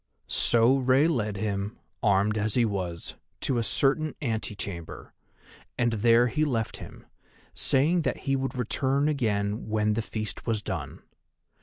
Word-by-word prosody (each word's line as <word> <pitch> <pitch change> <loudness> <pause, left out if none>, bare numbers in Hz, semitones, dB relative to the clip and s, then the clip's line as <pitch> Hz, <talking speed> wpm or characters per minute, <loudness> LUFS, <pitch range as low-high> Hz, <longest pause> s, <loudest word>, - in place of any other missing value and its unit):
So 120 +3 +3
Rei 130 +3 +4
led 105 -10 -1
him, 100 0 -3 0.2
armed 100 0 +3
as 110 0 -1
he 120 -2 +4
was, 90 -5 -4 0.3
to 125 -3 0
a - - 0
certain 145 +6 +1
antechamber, 105 - -5 0.6
and 120 -1 +1
there 115 +2 +4
he 125 +6 0
left 115 -7 -1
him, - - -11 0.5
saying 155 +6 +2
that - - -2
he 135 -1 +2
would 135 -1 -2
return 135 +4 0
again 110 -7 -1
when 105 0 +1
the 115 - 0
feast 110 +1 -5
was 110 -3 0
done. - - -5
115 Hz, 145 wpm, -27 LUFS, 105-135 Hz, 0.6 s, Rei